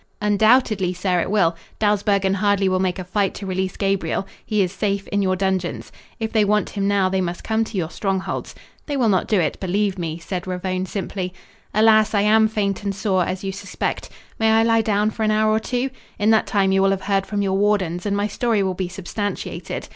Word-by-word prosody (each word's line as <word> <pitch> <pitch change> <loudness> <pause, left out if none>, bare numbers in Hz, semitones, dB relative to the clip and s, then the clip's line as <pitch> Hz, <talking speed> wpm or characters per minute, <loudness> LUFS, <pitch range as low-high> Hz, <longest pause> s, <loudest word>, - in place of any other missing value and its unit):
"Undoubtedly, 210 -2 +3
sir, 180 0 0
it 170 - -1
will. 190 -5 +2 0.2
Dawsbergen 200 -2 +2
hardly 200 0 +2
will 185 0 +1
make 185 -1 0
a 185 - -4
fight 195 +2 -1
to 200 - -6
release 190 0 -2
Gabriel. 195 -1 0 0.2
He 210 -2 +1
is 180 - -2
safe 200 0 -2
in 205 - 0
your 185 -1 +1
dungeons. 190 -2 -2 0.3
If 220 -1 -3
they 220 -2 +4
want 210 +1 +1
him 200 -1 -1
now, 200 -2 +3
they 190 0 0
must 175 -1 -4
come 220 0 +1
to 215 - -6
your 165 -2 -2
strongholds. 195 -2 -3 0.3
They 290 -2 -2
will 240 -4 +3
not 185 -3 +2
do 210 -4 +2
it, 170 - -1
believe 195 +1 -1
me," 165 -2 -3
said 180 +2 -5
Ravone 185 0 -2
simply. 185 -1 -4 0.4
"Alas, 215 0 +4
I 200 - +4
am 220 +1 +5
faint 205 -3 -1
and 200 -1 -3
sore, 190 -2 +1
as 185 +1 -4
you 195 - -2
suspect. 195 +1 -4 0.3
May 220 0 +3
I 220 0 +4
lie 225 0 +3
down 210 0 +1
for 220 - -7
an 215 - +2
hour 215 0 +3
or 215 - +2
two? 250 +3 -2 0.3
In 210 +2 +3
that 220 - +3
time 195 -2 +2
you 195 0 +3
will 195 - +4
have 195 -1 -1
heard 195 0 0
from 205 -1 -1
your 190 -1 0
wardens 195 -3 +1
and 200 0 0
my 205 - +1
story 215 0 0
will 190 -1 0
be 185 -1 -3
substantiated. 195 +2 -5
200 Hz, 225 wpm, -21 LUFS, 185-210 Hz, 0.4 s, am